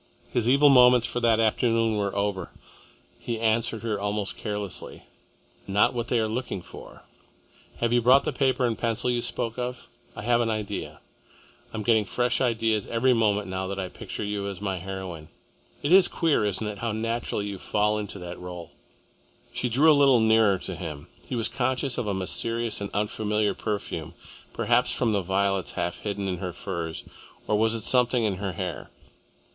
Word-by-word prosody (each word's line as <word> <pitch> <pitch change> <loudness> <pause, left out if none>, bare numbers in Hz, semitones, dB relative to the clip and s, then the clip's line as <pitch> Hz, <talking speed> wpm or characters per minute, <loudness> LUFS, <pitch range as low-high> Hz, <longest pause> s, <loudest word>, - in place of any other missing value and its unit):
His 120 -1 +1
evil 140 +3 +6
moments 125 -2 +7
for 120 - -2
that 115 -2 +3
afternoon 115 0 +2
were 100 -1 -1
over. 100 -3 -1 0.7
He 115 -2 -4
answered 115 0 0
her 110 -3 -1
almost 105 0 -2
carelessly. 105 -3 -5 0.6
"Not 105 +6 +3
what 120 -1 -3
they 120 - +1
are 110 - +1
looking 110 -5 -4
for. - - -12 0.7
Have 115 0 0
you 120 - +4
brought 130 +4 +6
the - - -2
paper 130 -2 +1
and 115 -2 0
pencil 115 +2 -1
you 120 -1 0
spoke 115 0 -3
of? 125 0 -4 0.3
I - - -7
have 120 +1 +3
an 115 - 0
idea 110 -2 -4 0.7
I - - -6
am 110 - -3
getting 110 -1 +3
fresh 120 +5 0
ideas 115 -4 +1
every 120 +3 +2
moment 105 -3 +1
now 95 0 -3
that 100 +1 -4
I 95 -1 -3
picture - - -6
you 100 -1 -3
as 100 -2 -5
my 95 -2 -2
heroine. 90 -4 -7 0.5
It 145 - 0
is 190 0 +8
queer, 160 -10 +1
isn't 105 +1 -2
it, 105 -2 -5
how 115 -1 -1
naturally 115 -1 -2
you 100 -2 -5
fall 105 +2 +1
into 105 -1 -6
the 90 -1 -7
role?" 90 -1 -8 0.8
She 125 - -1
drew 145 +7 +5
a - - +7
little 140 -4 +5
nearer 110 -3 +4
to 95 0 -5
him. 80 -4 -7 0.2
He - - -3
was 115 -2 +1
conscious 130 +1 -1
of 120 - -3
a 100 - 0
mysterious 115 +4 -1
and 100 - -3
unfamiliar 105 0 0
perfume, 85 -6 -4 0.4
perhaps 120 +1 +2
from 115 -3 +1
the 100 - +1
violets 95 0 0
half 85 - -2
hidden 100 -1 -3
in 90 -1 -2
her 90 0 -5
furs, 80 -1 -5 0.4
or 105 - +2
was 110 +2 +2
it 110 - -5
something 125 0 +3
in 100 -4 0
her 100 -1 -3
hair? 90 -1 -5
110 Hz, 185 wpm, -26 LUFS, 100-120 Hz, 0.8 s, is